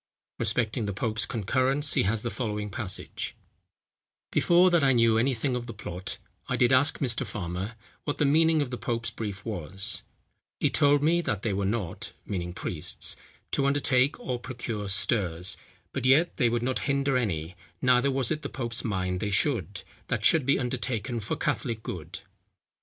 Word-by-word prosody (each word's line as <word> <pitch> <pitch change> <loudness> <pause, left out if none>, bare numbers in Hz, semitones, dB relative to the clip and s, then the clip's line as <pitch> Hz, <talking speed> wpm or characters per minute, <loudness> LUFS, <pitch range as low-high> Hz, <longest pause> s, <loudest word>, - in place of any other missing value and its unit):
Respecting 115 0 0
the 100 - -2
pope's 110 +2 -1
concurrence 130 +6 +3
he - - +3
has 110 -1 -1
the 120 - -2
following 105 -4 -3
passage: 100 -2 -4 1.0
"Before 180 +1 +5
that 170 -4 +4
I 135 -1 +5
knew 115 -2 +4
any 130 +3 +2
thing 125 +2 -1
of 120 -1 -4
the 115 - -7
plot, 95 -2 -5 0.3
I - - 0
did 125 +1 +4
ask 145 +5 +4
Mr. 130 -2 +1
Farmer, 95 0 -4 0.3
what 145 - -2
the 150 - +2
meaning 160 +1 +4
of 130 - -7
the 125 - -4
pope's 115 -1 -2
brief 100 -4 -6
was: 100 +2 -1 0.6
he - - +2
told 145 0 +4
me 170 +3 +3
that 105 - -2
they 110 - 0
were 95 0 0
not 100 -5 -3
(meaning 90 -3 -3
priests) 85 -3 -3 0.4
to 140 - +2
undertake 140 -1 +2
or 125 -2 -3
procure 115 -5 -5
stirs; 95 -3 +1 0.4
but - - -3
yet 140 +7 +4
they 125 -5 +3
would 120 0 0
not 130 +1 0
hinder 140 -1 +1
any, 90 -8 -1 0.2
neither 125 +3 +4
was 135 0 0
it 155 -1 -1
the - - -5
pope's 120 -4 -2
mind 90 -4 -1
they 105 - -1
should, 100 - 0 0.2
that - - -1
should 150 -5 +5
be 140 - +4
undertaken 120 -1 -2
for 105 - -3
Catholic 115 -5 -2
good. 90 +2 -6
115 Hz, 175 wpm, -28 LUFS, 100-135 Hz, 1.0 s, Before